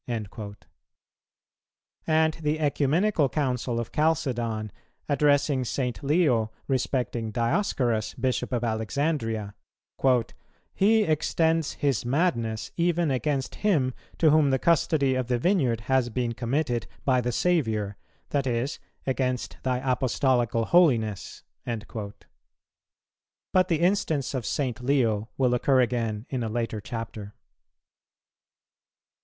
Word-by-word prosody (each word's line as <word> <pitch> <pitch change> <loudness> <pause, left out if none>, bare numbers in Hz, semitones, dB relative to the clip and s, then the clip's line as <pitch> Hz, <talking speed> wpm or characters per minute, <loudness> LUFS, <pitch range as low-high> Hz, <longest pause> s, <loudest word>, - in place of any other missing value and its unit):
"[162:3] 105 -3 -5 1.5
And 160 0 +3
the 150 0 0
Ecumenical 150 +3 +2
Council 125 -4 -1
of 120 - -5
Chalcedon, 120 -9 0 0.4
addressing 145 -2 +2
St. 125 +1 -2
Leo 140 -7 +2 0.2
respecting 125 -3 -1
Dioscorus, 120 - 0
Bishop 130 0 -1
of 120 -2 -1
Alexandria: 110 -1 -1 1.2
"He 215 +3 +4
extends 160 -1 +1
his 140 -6 0
madness 120 -5 0
even 170 -2 +1
against 135 0 -1
him 150 -12 +2 0.2
to 160 -2 +4
whom 150 -2 +4
the 135 - +3
custody 155 -4 +2
of 130 -2 -1
the 125 -1 +1
vineyard 130 - +1
has 130 0 +1
been 120 0 -1
committed 120 0 -1 0.2
by 130 -2 +3
the 125 0 -1
Saviour, 110 - 0 0.3
that 140 -2 0
is, 120 +4 -1 0.3
against 130 -2 -1
thy 130 -1 0
Apostolical 125 -3 +1
holiness."[162:4] 110 - 0 1.4
But 185 -1 +4
the 165 -2 0
instance 170 -8 +1
of 130 -4 -3
St. 125 -4 -2
Leo 120 -5 +1
will 125 -2 +2
occur 130 +2 +3
again 115 -3 0
in 130 -2 -1
a 115 - -2
later 115 -1 -2
Chapter. 110 -1 -7
130 Hz, 110 wpm, -26 LUFS, 115-150 Hz, 1.5 s, He